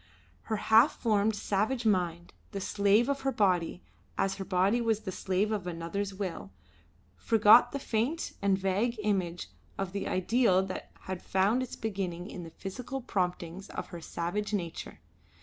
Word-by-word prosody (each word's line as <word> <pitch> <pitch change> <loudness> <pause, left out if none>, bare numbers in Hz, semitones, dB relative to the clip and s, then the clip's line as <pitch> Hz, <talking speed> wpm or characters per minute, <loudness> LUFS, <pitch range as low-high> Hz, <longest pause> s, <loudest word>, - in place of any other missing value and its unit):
Her 220 - +1
half 225 +7 +4
formed, 215 -1 +2
savage 215 +5 -1
mind, 175 -4 0 0.2
the 200 - -2
slave 200 +4 +3
of 280 0 -1
her 270 0 0
body 180 -6 +1 0.3
as 195 0 0
her 195 - -4
body 190 +5 +2
was 225 -2 +1
the 200 -3 -5
slave 190 +3 0
of 200 -4 -2
another's 175 +4 -3
will 185 - -5 0.6
forgot 210 - +6
the 280 - -2
faint 265 +5 -1
and 200 -1 +3
vague 200 +5 0
image 185 -4 -1 0.3
of 195 -2 -3
the 200 0 -3
ideal 190 0 +3
that 185 - -6
had 185 -1 -5
found 200 +6 +2
its 255 - -5
beginning 190 -4 -4
in 185 - -6
the 165 - -8
physical 245 +10 -6
promptings 180 -4 -3
of - - -6
her 175 -2 -8
savage 205 +6 -2
nature. 170 -4 -5
195 Hz, 160 wpm, -30 LUFS, 180-220 Hz, 0.6 s, forgot